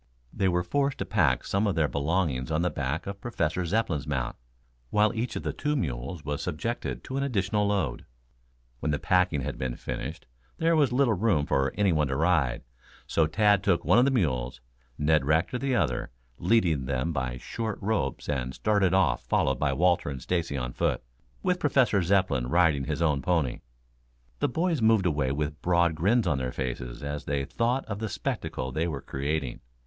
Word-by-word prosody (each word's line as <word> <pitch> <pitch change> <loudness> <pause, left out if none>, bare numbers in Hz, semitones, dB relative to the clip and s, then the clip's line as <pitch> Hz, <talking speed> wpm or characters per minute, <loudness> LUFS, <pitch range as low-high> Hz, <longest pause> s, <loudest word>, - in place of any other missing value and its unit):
They 95 - +1
were 90 0 +1
forced 140 +7 0
to - - -3
pack 80 - +2
some 100 +2 0
of 100 - 0
their 80 -3 +2
belongings 70 -3 -1
on 80 +2 0
the 90 - +1
back 70 +3 -2
of 100 0 -6
Professor 90 -7 -1
Zepplin's 85 -8 0
mount, 65 -4 -2 0.5
while 105 +2 +3
each 120 +2 -3
of - - -4
the - - -2
two 150 0 -1
mules 70 - -3
was 75 -1 -2
subjected 90 +8 -3
to 130 - -4
an 140 - 0
additional 105 -5 0
load. 95 -12 -1 0.7
When 75 - -1
the 75 - +1
packing 90 -3 +2
had - - -4
been 65 -2 -2
finished - - -6 0.3
there 165 0 +3
was 145 -5 +3
little 125 -2 +3
room 95 -7 +2
for 70 -1 +1
anyone 85 -8 +2
to 65 - -2
ride, 75 -6 +1 0.4
so 80 -2 +2
Tad 105 +3 +3
took 90 -4 +1
one - - +5
of 125 - +5
the - - +4
mules, 65 - 0 0.4
Ned 75 0 +3
Rector 80 - +1
the 135 -1 0
other, 75 - 0 0.3
leading 85 - +2
them 70 +5 -1
by 65 -3 -2
short 110 - -4
ropes, 110 +1 -1
and 65 -3 -2
started 100 -4 +2
off 65 -11 +2
followed 65 -1 +1
by 75 -1 +1
Walter 85 +3 +2
and 70 -2 -5
Stacy 80 0 -1
on 60 -1 -3
foot, - - 0 0.4
with 180 -1 +2
the - - -24
Professor 125 -7 +3 0.5
riding 80 -2 +3
his 75 +2 -1
own 75 -4 +2
pony. 80 -5 0 0.8
The - - +1
boys 165 +1 0
moved 110 -3 +4
away 75 -6 +1
with 75 +1 -3
broad 85 -1 +3
grins 100 +8 +2
on 75 -6 +1
their 65 -1 -2
faces 60 -1 -5
as 75 0 -4
they 70 -1 -1
thought 120 - 0
of 100 -2 -5
the 110 -1 -3
spectacle 65 -7 -3
they 80 +6 -1
were 70 -6 -4
creating. 70 -2 -3
85 Hz, 190 wpm, -27 LUFS, 70-105 Hz, 0.8 s, one